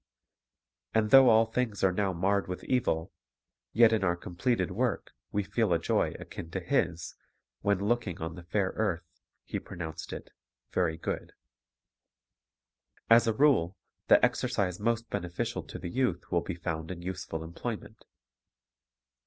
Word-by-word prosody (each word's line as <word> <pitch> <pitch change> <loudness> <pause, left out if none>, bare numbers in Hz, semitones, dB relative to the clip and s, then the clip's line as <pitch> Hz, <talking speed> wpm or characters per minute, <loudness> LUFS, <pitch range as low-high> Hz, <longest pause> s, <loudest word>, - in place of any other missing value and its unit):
And 110 -1 +2
though 135 -2 +9
all 110 0 +6
things 110 -2 -2
are 95 - +5
now 95 +1 0
marred 95 +3 +1
with 90 0 -5
evil, 100 -9 0 0.6
yet 115 0 +6
in 110 -3 +1
our 90 -2 +2
com 85 0 -10
pleted 95 -3 +1
work 120 +5 -1 0.2
we 105 - 0
feel 110 0 0
a - - +4
joy - - 0
akin 80 - -8
to 95 - -3
His, 85 -1 -1 0.5
when, 100 -1 +1
looking 120 -7 0
on 80 0 -4
the 90 - -9
fair 95 +2 -1
earth, 90 -6 0 0.4
He - - -4
pronounced 80 -3 -7
it - - -8 0.4
"very 85 -3 +1
good." - - -4 1.8
As 115 0 +7
a 115 - +3
rule, 110 - +3 0.3
the - - +7
exercise 90 -3 -1
most 115 +1 0
beneficial 85 0 -2
to - - -7
the 85 - -6
youth 125 -8 -1
will 85 -2 +2
be 95 - -4
found 80 -2 -4
in 90 -2 -6
useful 90 -3 -4
employment. 110 +6 -6
95 Hz, 155 wpm, -30 LUFS, 85-110 Hz, 1.8 s, though